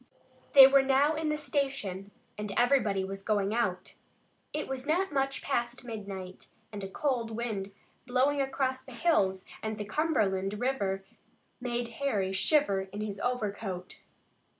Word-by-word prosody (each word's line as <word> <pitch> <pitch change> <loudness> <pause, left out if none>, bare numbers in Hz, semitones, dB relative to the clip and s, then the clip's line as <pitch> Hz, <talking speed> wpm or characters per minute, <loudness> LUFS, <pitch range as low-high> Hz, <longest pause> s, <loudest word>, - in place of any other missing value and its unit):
They 275 -2 +12
were 275 +1 +6
now 275 +3 +3
in 315 0 -1
the 300 - 0
station 270 -10 -2 0.3
and 210 -1 -5
everybody 230 -6 +3
was 195 +1 -5
going 205 0 0
out. 185 -6 -1 0.5
It 305 - -3
was 265 +1 -5
not 350 +2 +1
much 270 0 0
past 240 -3 -1
midnight, 200 -5 -7 0.2
and 205 -2 -6
a - - -3
cold 245 -1 -1
wind 220 -4 -3 0.4
blowing 265 +3 +2
across 265 -1 -1
the 260 0 -12
hills 195 - +2 0.2
and 220 -1 -3
the 210 - -4
Cumberland 205 -8 0
River 200 -7 -1 0.5
made 240 -1 -2
Harry 210 -9 0
shiver 195 -4 +2
in 205 +2 -5
his 205 -2 -4
overcoat. 205 -6 -3
235 Hz, 145 wpm, -30 LUFS, 195-270 Hz, 0.5 s, They